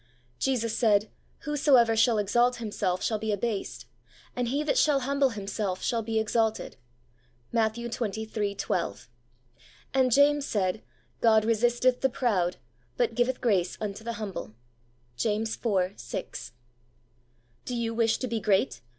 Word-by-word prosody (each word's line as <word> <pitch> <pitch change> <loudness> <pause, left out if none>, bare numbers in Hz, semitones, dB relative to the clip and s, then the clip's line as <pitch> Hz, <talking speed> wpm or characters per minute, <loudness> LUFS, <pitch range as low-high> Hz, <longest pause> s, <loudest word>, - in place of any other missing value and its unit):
Jesus 230 -4 0
said, 215 -3 +2 0.3
'Whosoever 270 -6 +3
shall 225 0 +4
exalt 240 +5 +2
him 230 -3 -6
self 185 -3 -1
shall 215 -2 0
he 220 0 -2
abased, 210 0 -3 0.5
and 245 -1 -1
he 280 +5 0
that 305 - +1
shall 290 -3 +3
humble 275 +1 +2
himself 200 -3 -4
shall 230 -1 0
be 225 0 -2
exalted' 220 0 0 0.8
(Matt, 220 -2 +1
xxiii. 220 -3 -3
12); 120 - -3 0.9
and 260 -1 +3
James 285 +2 +4
said, 185 -4 -1 0.4
'God 220 -2 +4
resisteth 240 +3 +2
the 265 - +3
proud, 195 -9 0 0.4
but 485 -2 +1
giveth 245 +1 0
grace 195 -7 +1
unto 210 0 -5
the 235 +1 -3
humble 200 - -6 0.3
' 120 0 -38
(James 220 - 0
iv. 195 -4 0
6). - - -6 0.6
' 120 0 -39
Do 250 - -3
you 230 -1 -2
wish 230 -1 +2
to 255 - -3
be 230 -1 -2
great 205 +5 +1
220 Hz, 145 wpm, -27 LUFS, 200-245 Hz, 0.9 s, shall